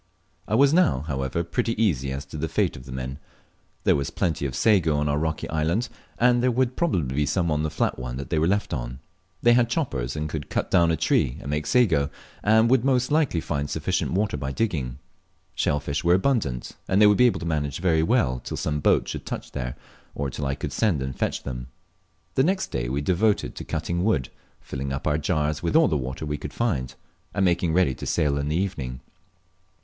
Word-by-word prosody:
I 110 - +1
was 140 +4 +5
now, 80 - +3
however, 70 +2 -2
pretty 115 +6 -1
easy 70 - +1
as 70 +1 -4
to 70 - -8
the 80 +2 -2
fate - - +1
of 65 - -11
the - - -8
men. 65 +2 -5 0.6
There - - +4
was 70 -1 -1
plenty 80 -4 -1
of 65 - -6
sago 90 -9 +3
on 75 0 0
our 75 0 +1
rocky 80 0 -2
island, 85 +10 0 0.3
and 120 0 +4
there 125 - +3
world 125 +1 +1
probably 85 - 0
be 75 0 +1
some 85 +1 +1
on 75 0 +1
the 80 - 0
fiat 75 - -1
one 65 0 -5
they 70 +4 -1
were 80 - +2
left 100 -1 0
on. 60 -3 -4 0.5
They 120 - +6
had 120 -1 +3
choppers, 70 - -2
and 75 0 -2
could 75 -1 -5
cut - - -2
down 85 -1 +5
a 80 - +1
tree 60 - +1
and 70 - -6
make 75 0 -2
sago, 85 - +3 0.3
and 110 +2 +4
would 130 -3 +4
most 130 0 +2
likely 150 - +2
find 70 -1 -2
sufficient - - -1
water 100 -4 0
by 70 -1 -3
digging. 70 - -2 0.6
Shell 75 - +1
fish 70 +2 -3
were 85 +1 +5
abundant, 95 - 0 0.2
and 95 - +2
they 105 - +7
would 105 -1 +5
be 125 - +7
able 120 - 0
to - - -4
manage 75 -4 -1
very 85 -3 +2
well 80 - +2
till - - -6
some 75 -1 -1
boat - - +3
should - - -5
touch - - -5
there, 60 -1 -4 0.4
or 70 -1 -2
till 70 +1 -3
I 70 - -1
could - - -5
send 90 -12 +1
and 65 -1 -4
fetch - - -2
them. 60 -2 -5 0.7
The 130 - +3
next 190 +4 0
day - - -2
we 70 +3 -1
devoted 100 +6 +1
to - - -7
cutting 85 +1 -2
wood, 75 - +1 0.3
filling 70 0 -5
up 70 - -4
our 75 0 +1
jars 75 0 0
with 85 - -1
all 160 - +6
the 80 - 0
water 65 +2 -3
we 75 -1 -3
could - - -7
find, 65 - -1 0.4
and 100 -1 +2
making 85 -2 +2
ready 85 -6 +3
to - - -7
sail 70 -1 +1
in 70 - -2
the 75 +2 0
evening. 65 -10 -3
80 Hz, 225 wpm, -25 LUFS, 70-105 Hz, 0.7 s, they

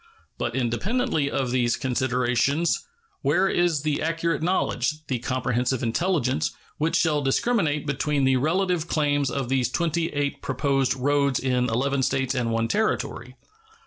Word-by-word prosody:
But - - -2
independently 150 - 0
of 130 -3 -1
these 120 -2 +2
considerations, 130 - 0 0.3
where 155 +8 +2
is 175 -6 +1
the 150 -2 0
accurate 165 -1 -1
knowledge, 155 -4 0
the 130 -5 -2
comprehensive 125 0 -1
intelligence, 135 +1 0 0.3
which 160 +2 +1
shall 150 -3 +2
discriminate 150 - +1
between 140 0 0
the 130 0 +3
relative 170 +4 0
claims 145 -4 +1
of 135 0 -2
these 130 -1 +1
twenty 165 +3 0
eight 145 -2 -2
proposed 135 -1 0
roads 140 0 +1
in 125 -2 0
eleven 135 +4 0
States 130 0 0
and 125 -3 -1
one 115 0 0
Territory? 120 +2 -1
140 Hz, 140 wpm, -25 LUFS, 125-155 Hz, 0.3 s, the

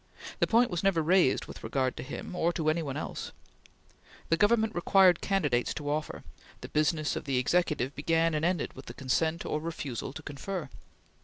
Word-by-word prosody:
The - - +3
point 235 0 +3
was 175 -1 -1
never 195 -5 +2
raised 175 -4 +3
with - - -11
regard 130 -2 0
to - - -4
him, 145 +6 -7
or 170 -1 +2
to 155 -2 +1
any 165 +2 -1
one 140 -4 -4
else. - - -5 1.0
The 165 - +4
Government 220 +3 +3
required 180 0 +4
candidates 145 -12 0
to 145 -1 -3
offer; 155 +1 -3 0.4
the - - -8
business 155 0 +1
of - - -5
the 135 -2 0
Executive 145 -1 +1
began 165 +3 +1
and 155 0 -1
ended 175 -2 0
with 130 - -12
the - - -8
consent 160 +5 0
or 150 - -1
refusal 145 -7 -4
to 160 - -9
confer. 150 +2 -5
160 Hz, 185 wpm, -29 LUFS, 145-180 Hz, 1.0 s, The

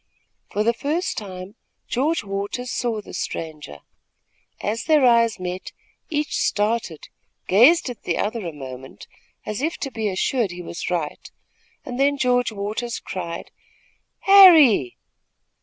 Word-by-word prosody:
For 210 - -1
the 235 +2 +2
first 305 +9 -2
time, 190 -1 -7 0.3
George 290 +6 0
Waters 205 +5 -4
saw 230 -3 -2
the - - -12
stranger. 155 - -6 0.8
As 220 +3 -3
their 305 -4 +4
eyes 230 -3 +3
met, 180 0 -6 0.4
each 300 -2 -2
started, 210 -6 -1 0.4
gazed 255 - +5
at 245 -4 -7
the 170 - -2
other 220 +1 -2
a - - -4
moment, 130 -3 -10 0.4
as 210 +3 -4
if 320 +3 -1
to 275 - -5
be 220 -3 -2
assured 205 +3 0
he 175 0 -8
was 170 - -5
right, 170 -4 -3 0.6
and 250 0 -6
then 285 +1 +2
George 245 -2 +1
Waters 215 +3 -4
cried: 170 -3 -6 0.7
"Harry!" 325 - +7
220 Hz, 135 wpm, -22 LUFS, 185-255 Hz, 0.8 s, Harry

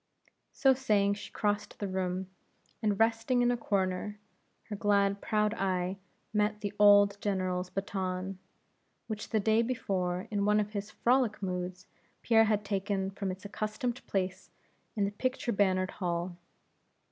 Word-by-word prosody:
So 270 -2 +4
saying 210 -6 +2
she 205 - -8
crossed 210 0 -1
the 205 - -3
room, 185 0 -2 0.5
and 210 -3 +1
resting 225 +2 +3
in 245 - +4
a - - +2
corner 200 -2 -1 0.5
her 210 - -3
glad 200 -1 +2
proud 210 0 +1
eye 185 -2 -1 0.4
met 210 0 +1
the 205 -1 -3
old 205 -1 +6
General's 185 -2 -1
baton, 190 -1 -3 0.7
which 215 -1 -5
the 220 - +2
day 220 +2 +3
before 190 -7 -1
in 205 -1 0
one 210 +1 +4
of 210 0 -1
his 205 0 -4
frolic 240 -3 +2
moods 180 0 -3 0.4
Pierre 225 -1 +5
had 210 -1 +1
taken 195 -1 -1
from 195 0 -4
its 185 +2 -6
accustomed 215 +4 -3
place 185 -2 -2 0.5
in 205 -2 +2
the 200 - -2
pictured 250 0 -2
bannered 185 -2 +2
hall. 175 -1 -2
200 Hz, 145 wpm, -31 LUFS, 190-215 Hz, 0.7 s, old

